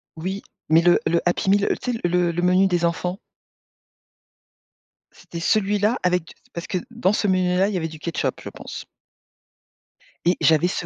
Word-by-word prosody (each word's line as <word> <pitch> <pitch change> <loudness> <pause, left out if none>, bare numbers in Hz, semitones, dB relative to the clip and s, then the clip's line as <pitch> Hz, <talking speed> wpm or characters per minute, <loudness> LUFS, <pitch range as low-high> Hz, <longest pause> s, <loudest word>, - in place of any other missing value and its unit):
Oui 190 +5 -4 0.3
mais 160 +1 +6
le 175 0 +4
le 170 0 +2
Happy 175 +2 0
Meal 200 +1 +3
le - - 0
tu 250 - -3
sais, 230 - -4
le 175 0 +2
le 170 +1 -2
menu 185 +2 +4
des 175 -2 +1
enfants? 180 +2 -2 1.9
C'était 170 - -10
celui-là 210 +5 +1
avec 180 -2 +1
d - - -14 0.2
parce 170 - -6
que 185 - -1
dans 230 -4 +1
ce 210 - 0
menu 185 -1 +2
là, 195 +2 +3
il - - -4
y - - 0
avait 165 -2 -2
du 160 -1 -11
ketchup, 170 +2 -3
je - - -7
pense. - - -9 1.4
Et 175 +1 +4
j'avais 160 +2 +4
ce - - -3
180 Hz, 190 wpm, -22 LUFS, 170-195 Hz, 1.9 s, mais